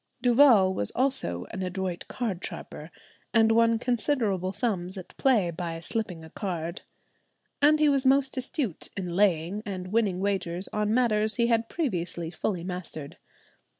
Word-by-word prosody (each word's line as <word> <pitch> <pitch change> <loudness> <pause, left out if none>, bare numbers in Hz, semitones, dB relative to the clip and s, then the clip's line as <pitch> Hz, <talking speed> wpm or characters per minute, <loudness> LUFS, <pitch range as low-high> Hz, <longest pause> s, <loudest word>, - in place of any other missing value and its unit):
Duval 240 -7 +6
was 100 - 0
also 255 - 0
an - - -5
adroit 185 -1 -3
card 210 -8 -3
sharper, - - -7 0.5
and 225 0 +5
won 230 0 +4
considerable 225 -6 0
sums 190 -5 -2
at 185 - -10
play 220 -10 +3
by 165 0 -5
"slipping 180 -2 -4
a 160 - -14
card;" 170 -3 -4 0.8
and 300 +2 +6
he 305 - +4
was 275 -2 +3
most 270 0 +3
astute 255 - -2
in 180 -3 -3
laying 185 0 +2
and 185 -4 -5
winning 205 -4 +1
wagers 190 -2 -2
on 210 0 0
matters 220 -3 +2
he 235 - +2
had 230 -1 +1
previously 175 - -2
fully 180 -1 -2
mastered. 175 -5 -6
200 Hz, 150 wpm, -27 LUFS, 180-235 Hz, 0.8 s, Duval